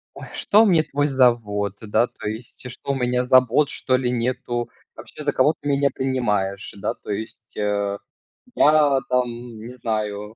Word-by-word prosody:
Ой, - - -9
что 215 +2 +4
мне 175 -7 +4
твой 145 -1 -1
завод? 115 -7 +2
Да, 110 +2 +1
то - - -7
есть 115 +3 -8
что, 135 +3 -4
у - - -1
меня 125 -1 0
забот, 130 +2 +4
что 130 - 0
ли, 125 -1 -1
нету? 120 0 -2 0.3
Вообще, - - -10
за 145 -1 0
кого 140 +5 +3
ты 145 - -5
меня 140 0 +2
принимаешь? 105 -7 -1
Да, - - -2
то - - -11
есть, 110 +2 -6
э, 100 -1 -1 0.6
я 150 -2 +5
там 125 -1 +2 0.3
не 115 +3 -9
знаю 105 -3 -3
125 Hz, 170 wpm, -22 LUFS, 110-135 Hz, 0.6 s, я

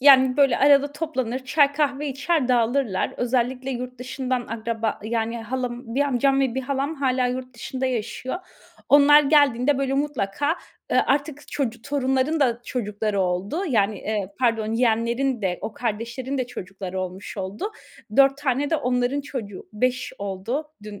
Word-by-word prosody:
yani, 265 -2 +7
böyle, 275 -4 +4
arada 285 0 +5
toplanır 260 -6 -2
çay 285 +1 +4
kahve 290 0 0
içer 280 +1 0
dağılırlar. 240 -4 +1
Özellikle 250 +1 0
yurt 250 -1 -5
dışından 255 0 -2
akraba 225 -1 -2
yani, 230 +1 -1
halam 245 0 -4
1 275 - +1
amcam 275 0 +2
ve 260 -3 +1
1 265 - 0
halam 275 +3 -2
hâlâ 260 -3 +1
yurt 255 0 -4
dışında 260 +2 -3
yaşıyor. 250 +2 -3 0.5
Onlar 290 +1 +7
geldiğinde 285 -2 +4
böyle 270 -1 0
mutlaka, 280 -4 -1 0.5
ııı, - - +5
artık 290 +1 -1
çocu 240 -5 -3
torunların 280 +2 0
da 240 -4 +2
çocukları 210 -4 -2
oldu. 185 - -1
Yani, 210 -5 +2
eee, 210 -3 -2
pardon 225 -3 +1
yeğenlerin 235 +2 +1
de 180 -2 0
o 220 - -4
kardeşlerin 235 +4 -3
de 255 - -1
çocukları 190 -4 -6
olmuş 185 +3 -6
oldu. 195 - -4 0.5
4 275 0 +6
tane 285 0 0
de 320 - +3
onların 250 +1 0
çocuğu, 225 -9 -7
5 255 +4 -1
oldu 200 +9 -3 0.2
dün 210 -1 -9
255 Hz, 150 wpm, -24 LUFS, 225-275 Hz, 0.5 s, yani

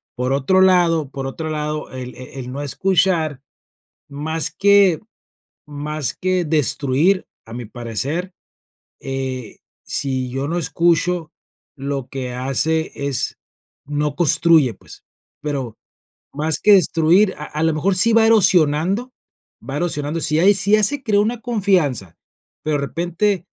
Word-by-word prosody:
Por 125 +1 -2
otro 140 +8 +2
lado, 170 -6 +3
por 135 -1 -5
otro 155 +4 -5
lado, 150 0 -3
el, 125 -1 -7
eh 130 - -9
eh, - - -6
el 125 -1 -6
no 140 - -4
escuchar, 165 -2 +1 0.7
más 155 +3 -2
que 200 -4 +4 0.7
más 150 -2 -4
que 185 -1 0
destruir, 150 +4 +1 0.2
a 115 - -11
mi 120 0 -6
parecer, 130 - -4 0.7
eh, 130 -3 -5 0.3
si 130 -2 -2
yo 135 +3 -3
no 170 - -1
escucho 170 0 0 0.4
lo 135 -2 -4
que 130 -2 -5
hace 145 +5 0
es, 140 -2 -2 0.5
no 145 0 -2
construye, 160 - +3
pues, - - -15 0.4
pero, 135 -7 -4 0.6
más 155 +2 0
que 210 - +6
destruir 180 +2 +4
a 150 - -6
a 150 +1 -3
la 160 -1 +2
mejor 185 +6 0
sí 230 +5 +3
va 225 0 +5
erosionando 190 - +3 0.6
va 140 +1 -3
erosionando, 150 -1 -2
si 155 0 +1
hay, 195 +4 +6
si 200 +1 0
ya 215 - +5
se 280 +7 +1
creo 210 -4 +2
una 230 +2 -2
confianza, 180 - 0 0.5
pero 155 -1 0
de - - -3
repente, 175 +2 -1
155 Hz, 140 wpm, -20 LUFS, 135-185 Hz, 0.7 s, que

